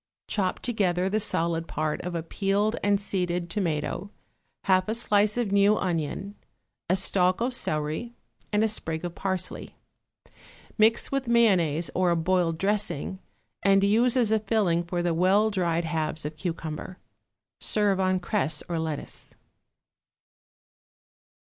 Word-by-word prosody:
Chop 190 -4 0
together 190 -6 0
the 215 +2 +1
solid 165 -5 0
part 155 0 -2
of 180 -1 -5
a 165 - -2
peeled 200 +5 0
and 205 -1 +3
seeded 180 -3 -2
tomato, 175 0 -2 0.5
half 185 +1 +2
a 220 - 0
slice 210 -2 +2
of 235 -5 -1
new 200 +1 +4
onion, 180 +2 -2 0.6
a 185 - +4
stalk 185 -1 +2
of 245 +2 -1
celery 155 +5 -1 0.4
and 210 +1 +2
a - - +3
sprig 165 -6 -2
of 175 - -5
parsley; 185 -1 -3 1.0
mix 220 +1 +3
with 275 -2 -1
mayonnaise 185 -9 +3
or 180 -1 +2
a 170 - +2
boiled 170 -1 +1
dressing 195 -2 -1 0.4
and 195 0 +4
use 230 +5 +3
as 230 -4 +3
a 220 - +3
filling 195 -5 +1
for 175 0 -3
the 175 -1 +1
well 195 +6 +3
dried 170 -4 0
halves 155 -1 -2
of 150 +1 -5
cucumber. 165 +2 -5 0.6
Serve 205 -3 +1
on 185 0 +1
cress 175 -5 -1
or 170 -2 -2
lettuce. 160 -2 -5
185 Hz, 140 wpm, -26 LUFS, 170-210 Hz, 1.0 s, new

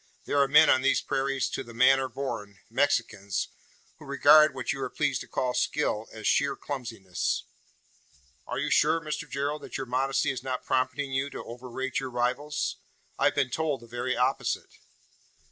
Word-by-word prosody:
There 145 - +1
are 140 - +4
men 150 +3 +7
on 130 - +5
these 135 +1 +3
prairies 135 -1 -1
`to - - -3
the 115 -1 -12
manner 130 +2 +4
born' 105 -8 -5
Mexicans 115 -7 0 0.5
who 155 - -12
regard, 145 +2 +6
what 125 -3 -2
you 135 - -6
are - - -2
pleased 145 -3 0
to - - -9
call 125 -1 -1
skill, 120 -6 0
as 110 -2 -9
sheer 140 +5 +2
clumsiness." 115 -10 -3 1.0
"Are - - -3
you - - -1
sure, 160 +2 +4
Mr 155 -1 -5
Gerald, 145 +2 -2
that - - -6
your 135 - -4
modesty 130 +2 +1
is 130 - -5
not 130 -1 -4
prompting 135 +2 0
you 135 +1 0
to - - -7
overrate 125 +2 -4
your 135 -2 -4
rivals? 125 +5 -1 0.4
I - - +3
have - - +3
been 135 -3 +1
told 155 -5 -1
the - - -12
very 120 +2 -3
opposite." 125 - 0
135 Hz, 180 wpm, -28 LUFS, 125-145 Hz, 1.0 s, men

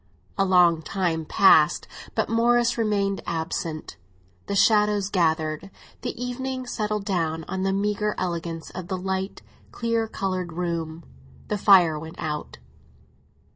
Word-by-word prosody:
A 195 - +2
long 175 -3 +4
time 165 -2 -1
passed, 155 -4 +5 0.3
but - - +1
Morris 235 +1 +3
remained 205 -3 0
absent; 160 - -4 0.5
the 200 - -2
shadows 210 -1 +3
gathered; 160 -1 0 0.3
the - - -5
evening 255 +1 -3
settled 210 -3 -2
down 165 -4 -1
on 190 +1 -3
the 195 0 +1
meagre 210 +1 0
elegance 170 -2 -4
of 180 -1 -7
the 185 - -2
light, 190 +1 -3 0.3
clear 230 -1 -1
coloured 185 -5 -3
room; 165 -1 -3 0.5
the 210 - 0
fire 180 -7 +6
went 160 +1 -9
out. 150 -1 -4
190 Hz, 130 wpm, -25 LUFS, 165-210 Hz, 0.5 s, fire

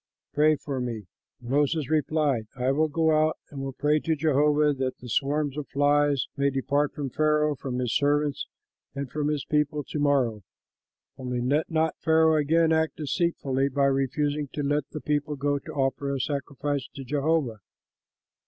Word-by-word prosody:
Pray 155 +1 +4
for 140 -2 -5
me." 115 -4 -4 0.3
Moses 140 +4 0
replied, 150 -6 +1
"I 130 0 0
will 155 +3 +2
go 160 +1 +1
out 155 0 +2
and 140 -2 -6
will 135 0 -3
pray 150 +3 +2
to 160 +1 0
Jehovah 150 0 +3
that 130 -1 -3
the 125 - -11
swarms 145 +4 0
of 145 - -6
flies 145 -1 +2
may 140 0 +2
depart 140 +2 0
from 140 -3 -4
Pharaoh, 150 +1 +2
from 130 -2 -5
his 125 -2 -1
servants 145 0 +1 0.5
and 140 -2 -5
from 150 -1 -1
his 150 -2 -1
people 150 0 0
to 150 - -5
morrow; 135 -7 +1 0.8
only 125 -1 -3
let 140 +6 0
not 160 -1 0
Pharaoh 160 0 +4
again 160 +2 +3
act 160 0 +1
deceitfully 140 -3 0
by 140 +1 +1
refusing 145 +2 0
to 145 - -3
let 145 0 0
the 155 - -7
people 150 0 -1
go 145 +1 0
to 155 - -10
offer 140 -1 -1
a 135 - -2
sacrifice 140 0 -3
to 135 - -6
Jehovah." 140 -3 0
145 Hz, 170 wpm, -26 LUFS, 135-150 Hz, 0.8 s, Pray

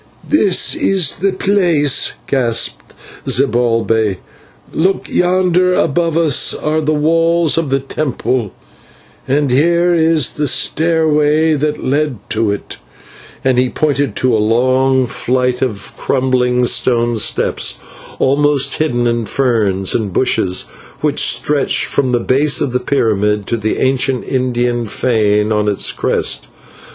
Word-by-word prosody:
"This 205 -11 +2
is 185 -7 +1
the 195 +4 0
place," 180 -8 +1
gasped 115 - -2 0.3
Zibalbay. 115 -5 +1 0.6
"Look, 185 +4 0
yonder 180 0 +1
above 165 +2 0
us 160 -5 +2
are 155 +1 -1
the 155 0 -1
walls 165 +1 +2
of 165 -3 -1
the 135 0 0
temple, 130 -6 -3 0.8
and 140 0 0
here 170 +6 +2
is 160 -4 +2
the 150 -1 -2
stairway 155 0 +1
that 150 0 -2
led 145 -1 -1
to 110 -1 0
it," 100 0 -5 0.7
and 130 -1 +2
he 125 0 +1
pointed 145 -6 -1
to 130 -2 +1
a 110 - +1
long 130 +4 +2
flight 125 +1 -1
of 105 -6 -4
crumbling 125 -2 0
stone, 120 -1 +1 1.0
almost 140 0 +1
hidden 120 -6 0
in 115 -2 -1
ferns 105 -7 0
and 105 -4 -2
bushes, 105 -4 0 0.4
which - - 0
stretched 145 -2 +1
from 130 -3 -1
the 120 - +1
base 135 +4 +1
of 140 -4 -1
the 125 - 0
pyramid 105 -6 0
to 115 - -1
the 110 -1 -2
ancient 130 -1 0
Indian 120 -2 -1
fane 105 -2 0
on 105 -1 0
its 100 -2 +1
crest. - - -1
130 Hz, 125 wpm, -15 LUFS, 120-155 Hz, 1.0 s, This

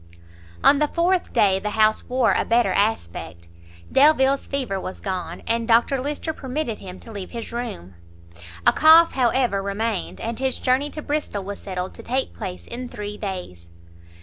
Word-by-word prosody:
On 285 - +6
the 300 - +2
fourth 350 +3 0
day 190 -2 +3
the 210 - -3
house 215 0 +4
wore 250 -2 +3
a - - +1
better 235 +1 +2
aspect; 85 - -2 0.4
Delvile's 275 -1 +4
fever 250 -9 -2
was 185 - -6
gone, 185 -3 -5
and 230 0 0
Dr 240 +3 +3
Lyster 295 +3 -3
permitted 265 -4 -4
him 185 -1 -9
to 230 - -11
leave 200 -4 -7
his 230 -2 -7
room; 95 - -5 0.7
a - - +6
cough, 320 +2 +7
however, 245 -5 +1
remained, 200 +1 -3
and 230 +1 -4
his 265 -1 0
journey 265 +3 +1
to 305 0 -8
Bristol 290 -9 -2
was 200 +1 -6
settled 185 -1 -5
to - - -11
take 260 +2 -2
place 180 -1 -7
in 245 +1 -7
three 210 0 -6
days. 180 - -6
230 Hz, 170 wpm, -23 LUFS, 195-265 Hz, 0.7 s, cough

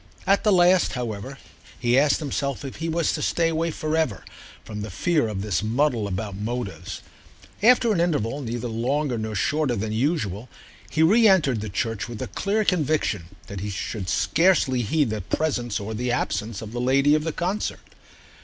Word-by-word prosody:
At 195 +1 +3
the 210 - +4
last, 180 0 +4
however, 125 +1 -5 0.4
he 120 0 +1
asked 145 +2 +4
himself 140 -2 -3
if 135 - -7
he 165 0 -3
was 165 0 +1
to - - -3
stay 165 -1 +1
away 165 +1 0
for 155 0 -2
ever 155 -11 -1 0.4
from 105 -1 -6
the 105 - -5
fear 150 - +1
of 100 -3 -4
this 100 -5 0
muddle 115 0 +1
about 100 +1 -4
motives. 105 -4 -5 0.6
After 235 0 +5
an 170 - +1
interval 145 -6 0
neither 120 -1 -3
longer 125 +3 -1
nor 110 0 -4
shorter 145 +5 +1
than 110 +1 -3
usual 120 - -1 0.4
he 160 - +2
re 220 +7 +6
entered 145 - +3
the 110 - -5
church 115 +2 -2
with 115 -3 -7
a - - -2
clear 210 +2 -1
conviction 155 - +1 0.2
that 100 - -7
he 105 +2 -4
should 100 -1 -4
scarcely 165 -8 +3
heed 135 +2 +1
the 110 -1 -2
presence 120 0 -1
or 105 +2 -5
the 120 +3 -2
absence 110 -3 -2
of 110 - -8
the 120 +1 -3
lady 135 +3 +4
of 155 0 +2
the 160 - -1
concert. 185 +7 -3
125 Hz, 185 wpm, -24 LUFS, 110-160 Hz, 0.6 s, re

